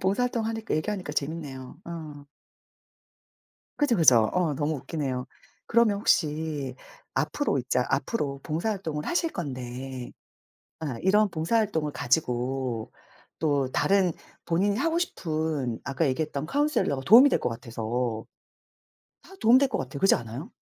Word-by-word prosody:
봉사활동하니까 225 +2 0
얘기하니까 180 0 -2
재밌네요. 140 -3 -4
어. 155 -4 -8 1.5
그죠 290 -6 +3
그죠. 125 - +6
어 175 -5 +1
너무 150 +2 0
웃기네요. 130 -4 -3 0.4
그러면 230 -3 +4
혹시 150 -7 0 0.4
앞으로 285 - 0
있자 125 0 0
앞으로 140 - -1
봉사활동을 165 -2 -2
하실 340 -1 0
건데 130 -4 -6 0.7
아 145 -7 -4
이런 210 +3 +4
봉사활동을 165 -2 0
가지고 125 -3 -1 0.5
또 145 -4 +1
다른 190 +1 +3 0.3
본인이 200 +5 +1
하고 330 +4 +1
싶은 155 - -2
아까 140 +3 0
얘기했던 145 +1 -2
카운셀러가 285 - +1
도움이 250 +7 +9
될 - - +2
것 - - -1
같아서 115 0 -3 1.0
다 385 - -15
도움 235 +3 +7
될 275 - +3
것 - - -2
같아요. 135 +1 -5
그렇지 195 +6 +5
않아요? 120 - -6
155 Hz, 300 characters per minute, -27 LUFS, 130-200 Hz, 1.5 s, 도움이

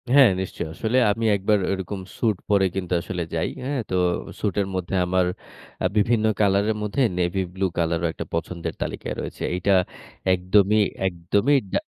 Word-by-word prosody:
হ্যাঁ, 135 -1 +7
নিশ্চয়ই। 90 -3 -5
আসলে 110 +8 0
আমি 115 +2 -2
১ 100 - -4
বার 105 -1 +5
ওরকম 95 +1 -3 0.2
স্যুট 110 -5 +1
পরে 100 -2 +4
কিন্তু 90 -2 -2
আসলে 90 0 -4
যাই। 80 - 0
হ্যাঁ? 140 +1 -2
তো 95 - -1 0.4
স্যুট 100 - -1
এর 95 - -2
মধ্যে 90 +1 -2
আমার 90 0 +2 0.5
অ্যা - - +2
বিভিন্ন 110 +1 +3
কালারের 100 +1 +3
মধ্যে 105 +5 -1 0.2
নেভি 90 +2 0
ব্লু 95 +1 -1
কালারও 85 0 +1 0.3
পছন্দের 85 +1 -3
তালিকায় - - -3
রয়েছে। - - -6
এইটা 95 +2 +2 0.6
একদমই, 100 +4 +3 0.3
একদমই 100 +10 +2 0.2
ডা - - +3
95 Hz, 160 wpm, -24 LUFS, 90-105 Hz, 0.6 s, হ্যাঁ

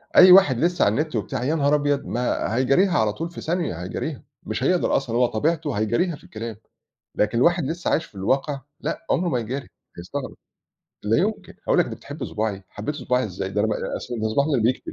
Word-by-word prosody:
أي 185 0 +9
واحد 150 -11 +7
لسّه 175 +1 +2
على 100 - +4
النِت 155 -2 -1
وبتاع 110 +3 -2
يا 155 +5 +1
نهار 145 -1 +3
أبيض! 145 -1 0
ما 120 -2 -1
هيجاريها 135 +9 +3
على 105 -1 +2
طول 165 +6 -4
في 170 - -9
ثانية 165 - -1
هيجاريها، 130 - -4 0.2
مش 110 +4 -3
هيقدر 180 +4 +2
أصلًا 120 -4 -3
هو 125 0 +4
طبيعته 145 +5 0
هيجاريها 120 - +1
في - - -18
الكلام. 115 0 -7 0.6
لكن 115 +3 +1
واحد 170 -2 +3
لسّه 165 +4 -2
عايش 165 - +1
في - - -22
الواقع 135 +8 0 0.2
لأ، 220 - -4
عُمره 175 0 +1
ما 125 -4 0
يجاري 130 +4 -4 0.3
هيستغرب، 130 +11 -6 0.7
لا 105 +2 +2
يُمكن، 210 +4 -2
هيقول - - +4
لك - - +5
دي - - -5
بتحب - - -7
صُباعي، 105 -3 -3
حبيتِ 110 +9 -5
صُباعي 125 -3 0
إزاي؟ 95 -1 -4
ده 105 +1 -1
أنا 110 - +2
ما - - 0
آآ - - -4
أصل 120 -2 -5
ده 110 - 0
صُباعي 140 +7 +1
اللي 130 -7 +1
بيكتب 125 +3 0
130 Hz, 215 wpm, -23 LUFS, 110-160 Hz, 0.7 s, أي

